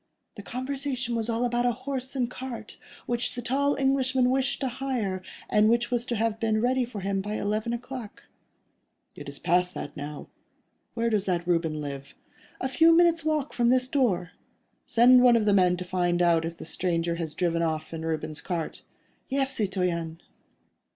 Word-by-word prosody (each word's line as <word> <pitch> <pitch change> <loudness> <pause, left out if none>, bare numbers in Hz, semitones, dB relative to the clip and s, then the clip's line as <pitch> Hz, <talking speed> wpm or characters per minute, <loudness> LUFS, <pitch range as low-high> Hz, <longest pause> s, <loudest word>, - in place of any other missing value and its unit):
"The 205 - -9
conversation 255 +1 -3
was 230 0 -2
all 230 +1 +1
about 240 0 +1
a 245 - +2
horse 260 +1 -5
and 250 -2 +1
cart, 245 -3 -8 0.3
which 240 0 -1
the 245 - -4
tall 280 +4 +1
Englishman 260 -2 +2
wished 270 +1 0
to 270 - 0
hire, 245 -7 -2 0.3
and 210 +1 +4
which 235 +1 +1
was 240 0 0
to 240 - -1
have 225 0 0
been 220 -1 +1
ready 250 +2 +2
for 230 -4 -7
him 195 0 -1
by 210 +2 -4
eleven 215 +3 -1
o'clock." 240 -2 -6 0.9
"It 145 -1 -9
is 140 - -7
past 180 +1 +1
that 145 - -6
now. 145 0 -6 0.7
Where 230 0 0
does 205 -2 +1
that 175 -2 0
Reuben 165 -3 +1
live?" 140 -1 -7 0.4
"A 260 - -1
few 325 +6 +5
minutes' 340 -1 +4
walk 305 -2 -1
from 240 -1 +2
this 255 0 +3
door." 210 - +1 0.6
"Send 245 +2 +6
one 245 -1 +6
of 225 -2 +2
the 205 - +4
men 180 -2 +4
to 180 - -5
find 175 -1 0
out 170 -2 +3
if 165 0 -5
the - - -8
stranger 170 0 -1
has 160 -3 -5
driven 170 -2 0
off 160 -1 -2
in 160 0 -5
Reuben's 155 -2 -3
cart." 170 -4 -4 0.5
"Yes, 270 0 0
citoyen." 180 -5 -1
225 Hz, 185 wpm, -27 LUFS, 175-255 Hz, 0.9 s, Send